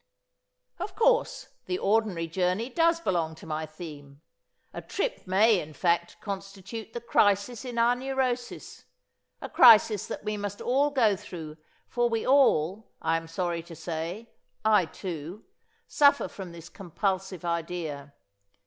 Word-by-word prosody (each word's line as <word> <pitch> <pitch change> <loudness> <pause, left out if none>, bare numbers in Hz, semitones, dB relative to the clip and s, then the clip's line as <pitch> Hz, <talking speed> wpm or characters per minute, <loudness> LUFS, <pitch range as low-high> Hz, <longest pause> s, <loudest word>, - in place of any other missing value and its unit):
"Of - - -5
course, - - +1 0.2
the 365 - -1
ordinary 205 - +1
journey 185 +7 -1
does 335 +3 +3
belong 170 - -1
to - - -13
my 155 0 -3
theme. 150 -3 -11 0.5
A - - -6
trip - - -3
may, 205 +2 +4
in 155 -1 -8
fact, 170 +3 0
constitute 200 +2 -7
the 235 - -4
crisis 205 0 +2
in 245 -2 -6
our 235 +1 +4
neurosis. 255 -1 -3 0.6
A - - -5
crisis 220 -4 +6
that - - -6
we 210 0 -2
must 205 0 -5
all 275 +4 +2
go 235 -8 +3
through, 165 -6 -9 0.3
for 240 -1 0
we 225 -1 -1
all 220 - +3
I 165 - +1
am 165 0 -3
sorry 170 0 -2
to 165 0 -12
say, 170 +7 -5 0.3
I 210 -6 +4
too 175 +2 -7 0.4
suffer 285 -1 +4
from 190 -3 -9
this 170 -1 -11
compulsive 190 -1 -3
idea. 165 -4 -4
195 Hz, 140 wpm, -27 LUFS, 165-235 Hz, 0.6 s, crisis